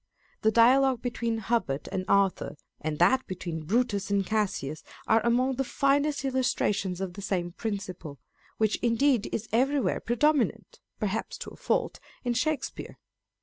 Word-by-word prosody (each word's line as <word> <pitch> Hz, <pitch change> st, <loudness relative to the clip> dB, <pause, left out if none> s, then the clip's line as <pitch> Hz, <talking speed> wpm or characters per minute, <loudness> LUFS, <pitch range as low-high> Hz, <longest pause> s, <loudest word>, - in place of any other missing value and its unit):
The 220 Hz, -, +4 dB
dialogue 255 Hz, +2 st, +4 dB
between 235 Hz, -2 st, -1 dB
Hubert 195 Hz, -11 st, -1 dB
and 185 Hz, -1 st, -2 dB
Arthur, 195 Hz, -5 st, +1 dB, 0.2 s
and 155 Hz, -1 st, -3 dB
that 190 Hz, -, +3 dB
between 170 Hz, -3 st, -5 dB
Brutus 205 Hz, -1 st, 0 dB
and 200 Hz, -1 st, +1 dB
Cassius 185 Hz, -8 st, -1 dB, 0.2 s
are 220 Hz, 0 st, +3 dB
among 250 Hz, +2 st, +2 dB
the 270 Hz, -, +1 dB
finest 280 Hz, +2 st, +1 dB
illustrations 205 Hz, -8 st, 0 dB
of 190 Hz, -2 st, -3 dB
the 200 Hz, -, -8 dB
same 180 Hz, -3 st, -2 dB
principle, 185 Hz, -7 st, -5 dB, 0.4 s
which 215 Hz, -1 st, +2 dB
indeed 240 Hz, 0 st, +2 dB
is 220 Hz, 0 st, -3 dB
everywhere 265 Hz, +4 st, +2 dB
predominant 240 Hz, -3 st, 0 dB, 0.2 s
(perhaps 215 Hz, +1 st, -2 dB
to -, -, -8 dB
a -, -, -12 dB
fault) -, -, -1 dB, 0.2 s
in 245 Hz, -1 st, 0 dB
Shakespeare. 285 Hz, +3 st, -2 dB
225 Hz, 145 wpm, -28 LUFS, 190-255 Hz, 0.4 s, The